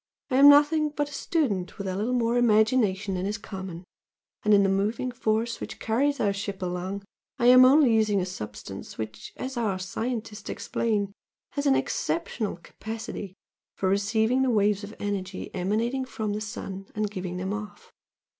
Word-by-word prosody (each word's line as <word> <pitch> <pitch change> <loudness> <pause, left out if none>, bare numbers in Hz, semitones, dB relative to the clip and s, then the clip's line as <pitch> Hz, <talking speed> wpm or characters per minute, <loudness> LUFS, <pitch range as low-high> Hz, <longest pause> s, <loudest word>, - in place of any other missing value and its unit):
I 255 - +3
am 280 +1 +9
nothing 300 +1 +5
but 290 0 -2
a - - -9
student 215 - -1
with 200 - -5
a 185 - -2
little 225 +6 0
more 235 -1 +1
imagination 215 -4 +3
than 185 +1 -2
is 210 +2 -2
common, 190 -4 -7 0.6
and 210 - +1
in 200 -1 +6
the - - +3
moving 205 +6 0
force 230 -1 -1
which - - -6
carries 280 +6 +1
our 200 -2 +2
ship 195 -1 -5
along 180 +2 -3 0.3
I 240 - 0
am 255 +1 +9
only 265 -2 +6
using 215 -2 +3
a 180 - 0
substance 105 - -8
which, 110 -1 -6
as 260 0 -5
our 215 -5 0
scientists 215 +2 -4
explain, 205 -3 -1 0.4
'has 285 0 -1
an 270 - +5
exceptional 235 -10 -1
capacity 220 -3 -7 0.4
for 190 - 0
receiving 220 +5 +2
the 265 - +2
waves 205 -2 +2
of 210 +2 -8
energy 195 -2 -4
emanating 225 +8 0
from 220 -4 -3
the 210 - -3
sun 195 -2 -6
and 210 -1 -1
giving 180 -2 -4
them 190 +2 -2
off.' 210 0 -8
210 Hz, 175 wpm, -27 LUFS, 195-245 Hz, 0.6 s, am